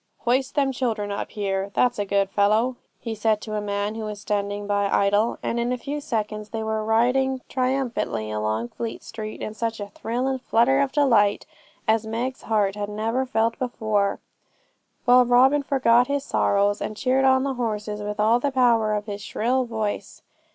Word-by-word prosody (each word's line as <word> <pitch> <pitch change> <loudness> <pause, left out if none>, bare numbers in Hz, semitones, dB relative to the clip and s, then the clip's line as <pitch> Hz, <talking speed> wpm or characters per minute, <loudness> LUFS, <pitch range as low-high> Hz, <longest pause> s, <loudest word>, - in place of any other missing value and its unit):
'Hoist 260 +3 0
them 275 -2 +2
children 225 -5 -2
up 200 - -4
here, 195 -1 -2
that's 245 -3 +2
a 205 - 0
good 195 0 +1
fellow,' 215 +5 +2 0.2
he 230 -2 -4
said 220 0 +1
to 215 - -6
a 210 - -1
man 205 0 -2
who 225 - -6
was 210 -1 -5
standing 205 0 -2
by 200 -1 +1
idle; 205 +4 +2
and 235 - -1
in 240 +1 0
a 250 - 0
few 285 +4 -5
seconds 215 -4 -3
more 225 - -4
they - - -3
were 220 0 -1
riding 255 +4 +2
triumphantly 255 - -1
along 110 +2 -2
Fleet 230 - -6
Street 215 -1 -7
in 215 - -4
such 225 0 -3
a 205 0 -6
thrill 235 +5 -3
and 265 -1 -1
flutter 250 +3 +3
of 280 -1 +1
delight 230 -9 +3 0.4
as 220 0 +2
Meg's 245 +4 -3
heart 210 -3 +1
had 205 0 -4
never 225 +5 -1
felt 230 0 0
before, 215 -5 0 0.9
while 250 0 +7
Robin 255 +4 +4
forgot 250 -3 +3
his 280 -1 -1
sorrows, 200 -3 +1
and 215 - -4
cheered 260 +2 +2
on 260 0 +4
the 275 -1 -1
horses 210 -4 -3
with 210 0 -5
all 225 +3 +4
the 285 - 0
power 235 -5 +3
of 210 0 -3
his 205 -1 -6
shrill 250 +5 0
voice. 220 -3 -4
225 Hz, 190 wpm, -24 LUFS, 205-250 Hz, 0.9 s, while